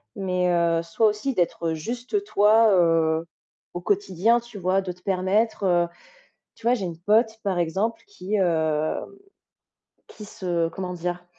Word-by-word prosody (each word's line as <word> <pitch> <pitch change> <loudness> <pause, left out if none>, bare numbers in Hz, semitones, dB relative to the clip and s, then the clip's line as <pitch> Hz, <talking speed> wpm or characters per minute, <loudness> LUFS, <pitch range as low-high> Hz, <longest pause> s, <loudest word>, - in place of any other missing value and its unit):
mais 180 -3 0
heu, 170 -1 +2
soit 170 +7 +1
aussi 215 +6 -1
d'être 170 -4 -1
juste 245 - -3
toi, 220 - +4
heu, 165 -2 +2 0.5
au 175 - -5
quotidien, 200 +4 +2
tu 235 -2 -12
vois, 185 +1 +1
de 185 -1 -5
te 180 +1 -15
permettre, 195 +4 0
heu 175 -1 +3 0.7
tu 230 0 -11
vois, 240 - +5
j'ai 215 -6 -3
une 165 -2 -7
pote 220 +4 +2
par 190 -4 -1
exemple 190 +7 -1
qui 215 - -6
hem, 160 -4 0 1.0
qui 210 - -11
se 175 -6 -2
comment 180 +2 -5
dire? 175 +1 -4
185 Hz, 155 wpm, -24 LUFS, 170-215 Hz, 1.0 s, vois